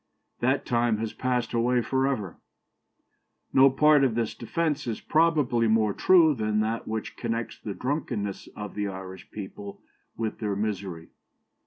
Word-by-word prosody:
That 130 +3 +1
time 120 -2 +1
has 110 0 -3
passed 125 -2 -1
away 120 +1 +2
for 130 +3 +1
ever.' 105 -10 -3 1.2
No 135 +1 +7
part 150 +1 +5
of 125 -4 +2
this 115 -1 -1
defence 150 +3 -2
is 115 - -2
probably 150 -8 +2
more 110 -2 +3
true 170 - +5
than 110 -4 0
that 110 +2 -2
which 110 0 -4
connects 115 -1 -3
the 100 -3 -6
drunkenness 125 -8 -3
of 105 -2 -6
the 105 0 -2
Irish 95 -1 -8
people 100 0 -8 0.3
with 110 -1 -3
their 105 -3 -1
misery. 95 -5 -4
115 Hz, 150 wpm, -27 LUFS, 105-130 Hz, 1.2 s, No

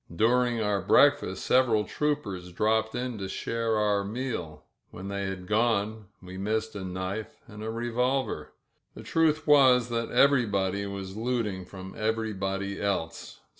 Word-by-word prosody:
During 120 +3 +3 0.3
break - - +6
fast - - -6
several 120 -5 +3
troopers 105 -12 -2
dropped 110 +4 +1
in 125 -2 -3
to 95 -1 -4
share 115 +2 -1
our 105 -1 +2
meal 110 -7 -4
— - - -50
when 95 +2 -8
they 100 0 -2
had 95 -1 -5
gone 110 0 0 0.2
we 95 +1 -8
missed 110 +2 -2
a 100 - -5
knife 95 +3 -5
and 105 -2 -10
a 110 - -3
revolver. 120 +3 -1 0.4
The - - -9
truth 160 -1 +1
was 130 -5 +5
that 115 -1 -2
everybody 100 -8 +2
was 100 -1 -6
looting 110 -5 -2
from 95 0 -9
every 110 0 -1
body 100 0 -3
else. 95 -5 -3
110 Hz, 150 wpm, -28 LUFS, 100-120 Hz, 0.4 s, break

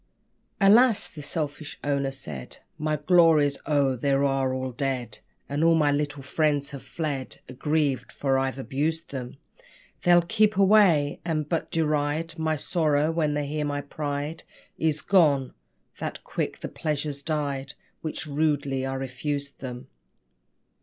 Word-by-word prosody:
"Alas!" 220 +3 +5
the 150 - -9
selfish 150 0 -3
owner 140 -1 0
said, 80 - -8 0.2
"My 155 0 0
Glories 155 -2 +4
oh! 140 -3 +2
they 140 +3 -1
all 140 +1 +2 0.4
are - - -5
dead! 125 -4 -3 0.3
And 145 +3 -1
all 165 0 +5
my 150 -2 +3
little 145 -1 -2
friends 145 0 0
have 140 -2 -7
fled 145 -5 -4
Aggrieved! 145 +1 -1
for 135 -1 +1
I've 135 0 -1
abused 150 +5 -2
them. 130 -1 -6 0.6
They'll 175 -1 +5
keep 215 +3 +2
away, 190 -8 +5
and 155 -3 -1
but 165 0 -2
deride 155 +1 -1
My 160 0 +1
sorrow, 155 -1 +1
when 155 -3 0
they 145 0 -1
hear 150 +1 -2
my 145 -1 -2
pride 145 +2 -4 0.4
Is 155 -1 0
gone; 145 -9 +3 0.5
that - - -5
quick - - -3
the - - -3
pleasures 150 -2 -3
died 140 -3 -2 0.3
Which 155 0 -4
rudely 145 -3 0
I 135 - -3
refused 140 +2 -4
them!" 125 0 -7
145 Hz, 140 wpm, -26 LUFS, 140-160 Hz, 0.6 s, Alas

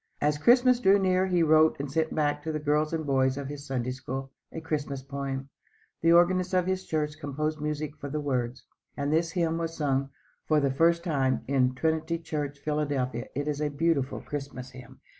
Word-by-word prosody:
As 150 0 +1
Christmas 245 - +5
drew 200 -3 +5
near 185 -1 +2
he 180 -2 +2
wrote 155 -1 +4
and 140 -1 -4
sent 160 +1 0
back 145 -1 +1
to 160 - -3
the 155 - -1
girls 150 +1 +1
and 160 -1 -2
boys 130 -1 +2
of 140 -1 -4
his 145 0 -7
Sunday 125 -2 -2
School, 130 +1 -5 0.2
a - - -5
Christmas 145 -4 -3
poem. 140 0 -4 0.5
The 165 - +4
organist 180 +2 +4
of 180 -1 +3
his 190 0 -2
church 155 -1 -2
composed 150 +1 -3
music 150 0 -3
for 140 - -6
the 150 +2 -2
words, 130 -3 -2 0.3
and 140 +1 -1
this 165 +1 +1
hymn 165 -2 0
was 165 0 -4
sung 135 -2 0 0.4
for 155 -1 +4
the 140 -2 +1
first 170 +4 +3
time 135 -6 +1
in 130 -2 +2
Trinity 160 +3 0
church, 150 -4 -4
Philadelphia. 140 -5 -2
It 145 +2 -2
is 150 0 -2
a 150 - +1
beautiful 145 -2 0
Christmas 140 -3 -6
hymn. 130 -1 -13
150 Hz, 195 wpm, -28 LUFS, 140-165 Hz, 0.5 s, Christmas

